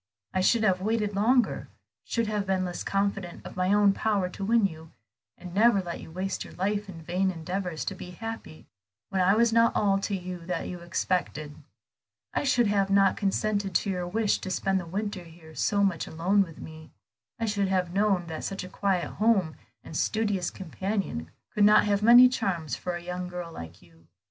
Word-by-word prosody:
I 185 Hz, -, +1 dB
should 225 Hz, +4 st, +3 dB
have 185 Hz, -3 st, +2 dB
waited 210 Hz, 0 st, 0 dB
longer, 240 Hz, +5 st, +2 dB, 0.4 s
should 230 Hz, -1 st, 0 dB
have 210 Hz, -2 st, -2 dB
been 190 Hz, -1 st, +1 dB
less 175 Hz, -1 st, -4 dB
confident 195 Hz, -3 st, -2 dB
of -, -, -9 dB
my 185 Hz, +1 st, +1 dB
own 205 Hz, -1 st, +5 dB
power 200 Hz, -3 st, 0 dB
to 195 Hz, -, -7 dB
win 225 Hz, +1 st, +3 dB
you, 160 Hz, -3 st, -5 dB, 0.5 s
and 180 Hz, -1 st, -10 dB
never 215 Hz, +1 st, +5 dB
let 175 Hz, -2 st, -5 dB
you -, -, -10 dB
waste 185 Hz, +4 st, -3 dB
your -, -, -12 dB
life 205 Hz, +2 st, -1 dB
in 165 Hz, -3 st, -9 dB
vain 180 Hz, +4 st, 0 dB
endeavors 180 Hz, -1 st, -4 dB
to -, -, -2 dB
be 180 Hz, -1 st, -9 dB
happy 220 Hz, -4 st, -8 dB, 0.4 s
when 190 Hz, -1 st, 0 dB
I 190 Hz, +3 st, +4 dB
was 230 Hz, 0 st, +3 dB
not 230 Hz, 0 st, +4 dB
all 195 Hz, -2 st, +2 dB
to 200 Hz, 0 st, -2 dB
you 180 Hz, -1 st, -6 dB
that 180 Hz, -2 st, -2 dB
you 180 Hz, -, -6 dB
expected. 170 Hz, -4 st, -2 dB, 0.8 s
I -, -, 0 dB
should 245 Hz, -4 st, +3 dB
not 200 Hz, -2 st, +1 dB
have 195 Hz, 0 st, +4 dB
consented 200 Hz, -1 st, -1 dB
to 200 Hz, -, +2 dB
your 180 Hz, -1 st, -3 dB
wish 215 Hz, +3 st, +1 dB
to -, -, -6 dB
spend 190 Hz, +1 st, 0 dB
the 175 Hz, -, -7 dB
winter 200 Hz, +1 st, -3 dB
here 165 Hz, -1 st, -15 dB
so 200 Hz, +5 st, +1 dB
much 185 Hz, -5 st, 0 dB
alone 180 Hz, +6 st, +2 dB
with 165 Hz, -5 st, -3 dB
me. 160 Hz, 0 st, -10 dB, 0.5 s
I 230 Hz, -, 0 dB
should 205 Hz, -2 st, 0 dB
have 180 Hz, -2 st, 0 dB
known 195 Hz, -3 st, +2 dB
that 160 Hz, -1 st, -6 dB
such 195 Hz, -1 st, -4 dB
a 185 Hz, -, -8 dB
quiet 190 Hz, -2 st, 0 dB
home 200 Hz, -7 st, +2 dB, 0.3 s
and -, -, -10 dB
studious 205 Hz, -2 st, 0 dB
companion 190 Hz, -, -4 dB, 0.2 s
could 210 Hz, -, +2 dB
not 210 Hz, +1 st, +6 dB
have 200 Hz, -1 st, +1 dB
many 240 Hz, +3 st, +9 dB
charms 180 Hz, -, -2 dB
for 180 Hz, -1 st, -4 dB
a 175 Hz, -, -7 dB
young 180 Hz, +1 st, -4 dB
girl 180 Hz, -1 st, -6 dB
like 85 Hz, -, -10 dB
you. 85 Hz, -1 st, -23 dB
190 Hz, 200 wpm, -27 LUFS, 175-205 Hz, 0.8 s, many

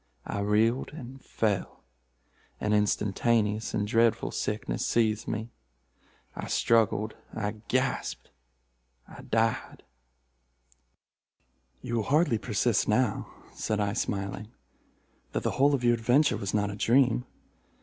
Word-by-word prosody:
I -, -, -3 dB
reeled 110 Hz, +6 st, +1 dB
and 135 Hz, -3 st, -10 dB
fell. 105 Hz, -5 st, -2 dB, 0.8 s
An 105 Hz, -, 0 dB
instantaneous 105 Hz, +1 st, +1 dB
and 105 Hz, -, 0 dB
dreadful 115 Hz, +1 st, +2 dB
sickness 105 Hz, +1 st, -2 dB
seized 110 Hz, -2 st, +1 dB
me. 110 Hz, +1 st, -3 dB, 0.8 s
I -, -, -5 dB
struggled—I 110 Hz, -1 st, 0 dB
gasped—I -, -, -5 dB
died." 115 Hz, 0 st, -1 dB, 2.0 s
"You 120 Hz, -, -2 dB
will 110 Hz, -, 0 dB
hardly 145 Hz, -6 st, +3 dB
persist -, -, +1 dB
now," -, -, +1 dB, 0.2 s
said 110 Hz, -1 st, -2 dB
I 100 Hz, -1 st, 0 dB
smiling, 100 Hz, -2 st, -3 dB, 0.9 s
"that -, -, -1 dB
the -, -, 0 dB
whole 140 Hz, +2 st, +3 dB
of 125 Hz, -, -4 dB
your 120 Hz, 0 st, +5 dB
adventure 120 Hz, +6 st, +3 dB
was 100 Hz, -, -3 dB
not 105 Hz, -1 st, +1 dB
a -, -, -6 dB
dream. 125 Hz, +2 st, +3 dB
110 Hz, 110 wpm, -28 LUFS, 105-120 Hz, 2.0 s, your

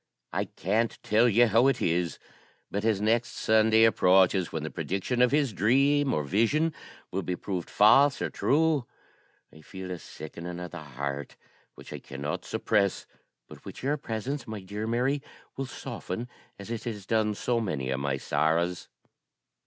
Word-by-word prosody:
I -, -, 0 dB
can't 110 Hz, +6 st, -1 dB
tell 115 Hz, +3 st, +4 dB
you 120 Hz, +3 st, +5 dB
how 115 Hz, +3 st, +4 dB
it 135 Hz, -, +2 dB
is, 85 Hz, 0 st, 0 dB, 0.5 s
but 100 Hz, +1 st, -2 dB
as 110 Hz, -3 st, +2 dB
next 115 Hz, +3 st, +1 dB
Sunday 110 Hz, 0 st, +4 dB
approaches, 95 Hz, -4 st, +4 dB
when 80 Hz, -2 st, -3 dB
the 80 Hz, -, -4 dB
prediction 100 Hz, +6 st, -2 dB
of 125 Hz, -, +6 dB
his 140 Hz, -4 st, +1 dB
dream, 135 Hz, +7 st, +3 dB
or 75 Hz, -, 0 dB
vision, 115 Hz, -, +1 dB, 0.4 s
will 95 Hz, -, -1 dB
be 90 Hz, 0 st, -3 dB
proved 90 Hz, -2 st, -4 dB
false 135 Hz, +7 st, +5 dB
or -, -, -2 dB
true, 150 Hz, -3 st, +2 dB, 0.7 s
I 80 Hz, -, -15 dB
feel 95 Hz, +3 st, -8 dB
a 90 Hz, -, -5 dB
sickening 85 Hz, +3 st, -8 dB
of 90 Hz, -1 st, -7 dB
the 90 Hz, -, -7 dB
heart, 70 Hz, 0 st, -5 dB, 0.4 s
which -, -, -11 dB
I -, -, -6 dB
cannot 70 Hz, +2 st, -5 dB
suppress, 100 Hz, -2 st, 0 dB, 0.4 s
but -, -, -13 dB
which -, -, -10 dB
your 145 Hz, +3 st, +1 dB
presence, 130 Hz, +2 st, -4 dB
my 110 Hz, -2 st, -6 dB
dear 105 Hz, +3 st, -5 dB
Mary, 125 Hz, +5 st, 0 dB, 0.3 s
will 135 Hz, 0 st, -4 dB
soften, 120 Hz, -3 st, -6 dB, 0.3 s
as 100 Hz, +3 st, -9 dB
it 115 Hz, -1 st, -4 dB
has 105 Hz, -5 st, -5 dB
done 110 Hz, -1 st, +1 dB
so 120 Hz, +3 st, 0 dB
many 70 Hz, -, -2 dB
of 65 Hz, -, -1 dB
my 70 Hz, -1 st, -1 dB
sorrows. 85 Hz, +5 st, 0 dB
105 Hz, 170 wpm, -28 LUFS, 90-120 Hz, 0.7 s, of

